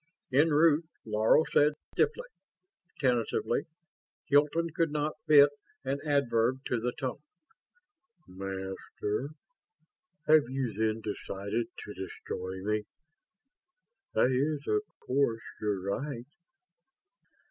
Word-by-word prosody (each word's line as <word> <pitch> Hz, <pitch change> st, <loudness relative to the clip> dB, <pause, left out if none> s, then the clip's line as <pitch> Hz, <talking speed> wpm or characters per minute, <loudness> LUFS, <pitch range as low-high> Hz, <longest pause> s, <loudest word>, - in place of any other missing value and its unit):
En 150 Hz, +5 st, +5 dB
route, 155 Hz, +1 st, +4 dB, 0.2 s
Laro 110 Hz, +7 st, +4 dB
said 150 Hz, +1 st, +5 dB, 0.2 s
stiffly? -, -, +1 dB, 0.7 s
Tentatively? 120 Hz, -2 st, +1 dB, 0.6 s
Hilton 150 Hz, +3 st, +3 dB
could 165 Hz, +1 st, +1 dB
not 150 Hz, 0 st, -1 dB
fit 145 Hz, -1 st, +8 dB, 0.3 s
an 135 Hz, +2 st, -1 dB
adverb 130 Hz, -4 st, +1 dB
to 125 Hz, -, +1 dB
the 125 Hz, +2 st, -1 dB
tone 130 Hz, 0 st, -3 dB, 1.1 s
"Master, 95 Hz, +5 st, -4 dB, 1.0 s
have 155 Hz, -5 st, +5 dB
you 130 Hz, -4 st, -2 dB
then 110 Hz, +1 st, 0 dB
decided 105 Hz, +2 st, -3 dB, 0.2 s
to 105 Hz, -, -7 dB
destroy 95 Hz, 0 st, -6 dB
me? 105 Hz, +1 st, 0 dB, 1.3 s
That 130 Hz, -, +4 dB
is 145 Hz, +3 st, 0 dB
of 420 Hz, -, +2 dB, 0.2 s
course 125 Hz, -4 st, +1 dB, 0.2 s
your 105 Hz, -2 st, -1 dB
right." 120 Hz, +5 st, -3 dB
125 Hz, 100 wpm, -30 LUFS, 105-145 Hz, 1.3 s, fit